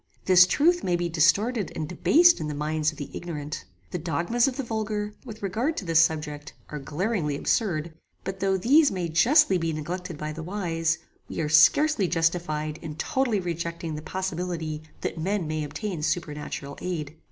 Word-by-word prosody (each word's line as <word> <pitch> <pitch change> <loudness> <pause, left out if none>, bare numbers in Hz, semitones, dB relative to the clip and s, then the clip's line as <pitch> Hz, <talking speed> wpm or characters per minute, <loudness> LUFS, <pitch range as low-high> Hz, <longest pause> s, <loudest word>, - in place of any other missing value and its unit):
This 180 -1 +7
truth 345 - +3
may 175 - +1
be 175 0 -1
distorted 200 +7 +2
and 155 - -3
debased 340 - +5
in 155 - -3
the 150 - -4
minds 155 +1 0
of 155 - -15
the 145 - -7
ignorant. 155 -3 -5 0.3
The 180 - -3
dogmas 175 - +1
of 265 -1 -3
the 275 - -2
vulgar, 215 -2 -3
with 220 -3 -9
regard 230 - -1
to 195 - -4
this 165 -2 +4
subject, 150 -2 0 0.2
are 150 - -5
glaringly 155 +2 -1
absurd; 170 -4 0 0.3
but 190 0 -5
though 195 0 +1
these 280 - +5
may 180 -3 -3
justly 185 - +4
be 165 -1 -1
neglected 170 +2 -5
by 150 0 -4
the 160 - -7
wise, 165 -3 -1 0.3
we - - -5
are 155 -2 -1
scarcely 190 - +5
justified 165 -2 -1
in 150 - -6
totally 260 - 0
rejecting 170 -2 -4
the 150 - -5
possibility 175 -3 -3 0.2
that - - -3
men 190 +2 -1
may 155 0 -2
obtain 180 +3 -4
supernatural 150 -3 -3
aid. 160 -5 -4
170 Hz, 175 wpm, -26 LUFS, 155-205 Hz, 0.3 s, This